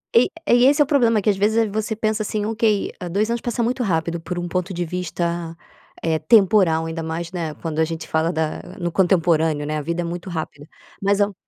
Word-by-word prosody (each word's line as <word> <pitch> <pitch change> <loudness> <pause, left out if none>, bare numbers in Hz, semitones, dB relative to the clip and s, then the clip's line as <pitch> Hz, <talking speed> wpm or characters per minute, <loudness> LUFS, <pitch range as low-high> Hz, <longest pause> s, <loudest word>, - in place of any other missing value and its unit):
E 235 +2 +5 0.2
e 245 -1 +5
esse 290 +2 +5
é - - +8
o 285 - -7
problema. 235 -7 +3
Que 210 - +1
às 195 - -3
vezes 220 +2 +2
você 220 +1 -2
pensa 215 0 -1
assim 210 0 -2
ok, 220 -2 +1 0.2
2 210 +4 +1
anos 235 0 -1
passa 240 0 -1
muito 245 +2 -1
rápido 170 -4 -1
por 175 +2 -5
um 175 - -3
ponto 180 +2 -2
de 175 0 -2
vista, 170 -1 -3 0.5
eh, 160 -1 +1
temporal, 185 -3 +4
ainda 165 0 -4
mais, 165 +2 -4
né, 165 -4 -3
quando 160 -1 -4
a 160 - +4
gente 165 0 -6
fala 160 +2 +1
da 160 -2 -2 0.2
no 175 0 -2
contemporâneo, 165 -4 +2
né, 155 +1 -2
a 150 - -2
vida 170 +3 -2
é - - -2
muito 175 +2 -5
rápida. 155 -3 -6 0.3
Mas 200 +1 +2
ao 205 0 +1
180 Hz, 225 wpm, -21 LUFS, 165-215 Hz, 0.5 s, é